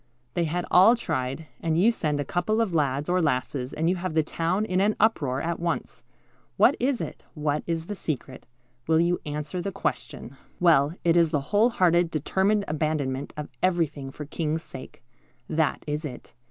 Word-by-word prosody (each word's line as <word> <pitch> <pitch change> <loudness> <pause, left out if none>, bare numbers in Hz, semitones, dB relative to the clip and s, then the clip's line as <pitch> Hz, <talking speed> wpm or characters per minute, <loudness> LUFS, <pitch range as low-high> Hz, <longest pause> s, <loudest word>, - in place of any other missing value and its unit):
They 170 - +1
had 175 +3 -2
all 195 +7 +7
tried, 135 - -3
and 165 0 0
you 220 +6 +5
send 150 -9 -1
a 145 - -1
couple 180 +9 0
of 220 -6 0
lads 145 -2 0
or 180 +1 +2
lasses, 130 -2 -1
and 160 +2 -1
you 180 +2 +2
have 175 -2 -4
the 160 - +4
town 170 +7 -1
in 185 -2 +1
an 210 +2 +2
uproar 145 - +1
at 170 0 -2
once. 170 0 -3 0.6
What - - +5
is 255 0 0
it? - - -6
What 150 -1 0
is 165 -1 -2
the 205 - -4
secret? 140 -10 -5 0.4
Will 160 0 +4
you 175 +1 +2
answer 150 +4 -3
the 200 - -3
question?" 135 -6 -4 0.2
Well, 160 -3 +4
it 170 -1 +3
is 170 -2 +5
the 145 +2 -3
whole 215 +4 +5
hearted, 175 -6 +3
determined 190 +7 +1
abandonment 150 -3 -1
of 150 - -5
everything 160 -7 0
for 150 - -8
the 145 - -12
King's 160 0 -2
sake. 130 - -11 0.4
That 160 -1 0
is 150 +1 -3
it. 130 -5 -8
165 Hz, 190 wpm, -26 LUFS, 150-180 Hz, 0.6 s, all